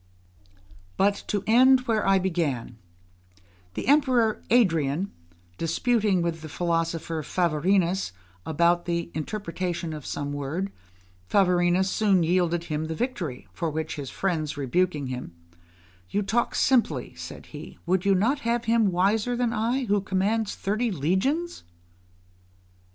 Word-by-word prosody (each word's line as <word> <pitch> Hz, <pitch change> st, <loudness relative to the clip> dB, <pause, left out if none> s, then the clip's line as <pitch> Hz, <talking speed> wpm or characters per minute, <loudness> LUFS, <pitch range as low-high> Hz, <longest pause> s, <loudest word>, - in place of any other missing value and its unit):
But 200 Hz, +1 st, +2 dB
to 205 Hz, -2 st, -1 dB
end 255 Hz, +4 st, +6 dB
where 225 Hz, -5 st, 0 dB
I 195 Hz, 0 st, +5 dB
began: 160 Hz, -11 st, -2 dB, 1.0 s
the -, -, -4 dB
Emperor 255 Hz, -6 st, +3 dB
Adrian, 170 Hz, -, +2 dB, 0.5 s
disputing 200 Hz, +2 st, +1 dB
with 165 Hz, -1 st, -2 dB
the 155 Hz, -, -8 dB
philosopher 165 Hz, -1 st, -1 dB
Favorinus 175 Hz, -, +1 dB, 0.3 s
about 170 Hz, +2 st, +2 dB
the 170 Hz, -1 st, -2 dB
interpretation 175 Hz, -1 st, -3 dB
of 150 Hz, -2 st, -7 dB
some 145 Hz, 0 st, -3 dB
word, 155 Hz, +8 st, -3 dB, 0.6 s
Favorinus 180 Hz, -1 st, +3 dB
soon 195 Hz, -3 st, +2 dB
yielded 175 Hz, 0 st, +1 dB
him 155 Hz, -2 st, -3 dB
the 160 Hz, 0 st, -4 dB
victory; 175 Hz, -, -4 dB
for 170 Hz, -3 st, -2 dB
which 160 Hz, +1 st, -4 dB
his 140 Hz, -3 st, -5 dB
friends 160 Hz, -6 st, -2 dB
rebuking 150 Hz, +2 st, 0 dB
him, 125 Hz, -8 st, -6 dB, 0.7 s
"You 205 Hz, -, 0 dB
talk 230 Hz, +4 st, 0 dB
simply," 260 Hz, -3 st, +2 dB
said -, -, -9 dB
he; -, -, -9 dB
"would 180 Hz, +1 st, +1 dB
you 195 Hz, -1 st, +3 dB
not 235 Hz, +10 st, +2 dB
have 235 Hz, -1 st, -1 dB
him 225 Hz, -3 st, +3 dB
wiser 210 Hz, +7 st, +1 dB
than 240 Hz, -1 st, 0 dB
I, 240 Hz, +4 st, 0 dB
who 205 Hz, -2 st, +1 dB
commands 200 Hz, +3 st, 0 dB
thirty 215 Hz, +5 st, -1 dB
legions?" 205 Hz, -, -1 dB
185 Hz, 130 wpm, -26 LUFS, 165-220 Hz, 1.0 s, end